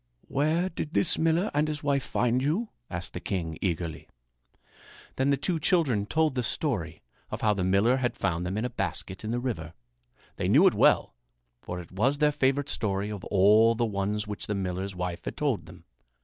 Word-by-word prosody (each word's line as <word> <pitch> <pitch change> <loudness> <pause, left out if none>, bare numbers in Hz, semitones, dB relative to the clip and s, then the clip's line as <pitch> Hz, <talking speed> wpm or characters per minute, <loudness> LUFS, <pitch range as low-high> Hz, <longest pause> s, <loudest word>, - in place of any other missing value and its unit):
"Where 155 +6 +1
did 165 -3 -5
this 175 - +2
miller 165 +5 +2
and 150 +1 +2
his 150 -1 -4
wife 140 -2 +1
find 125 +1 +1
you?" 175 - 0 0.2
asked 90 -1 -4
the - - -4
king 85 -4 -3
eagerly. 85 -4 -3 1.1
Then 130 +1 +2
the 140 - +3
two 165 +4 -1
children 145 - +2
told 155 +1 +2
the 125 - 0
story 120 - -2 0.3
of - - -5
how 105 -1 +3
the 100 -3 -2
miller 100 +7 +3
had 125 -2 -1
found 85 0 -1
them 90 +3 -3
in 110 - -1
a - - -1
basket 95 +3 -3
in 110 - -4
the 120 +1 0
river. 85 -11 -4 0.6
They - - -1
knew - - +6
it - - +6
well, - - +3 0.5
for 90 - -5
it 85 - -10
was 120 +10 +1
their 150 0 +3
favorite 140 0 +1
story 100 -2 -1
of 100 -3 -6
all 105 +4 +5
the 120 +1 +1
ones 105 0 -2
which 105 -1 -5
the 105 - -1
miller's 95 0 -3
wife 90 -1 -4
had - - -5
told - - -1
them. - - -13
110 Hz, 200 wpm, -28 LUFS, 95-145 Hz, 1.1 s, knew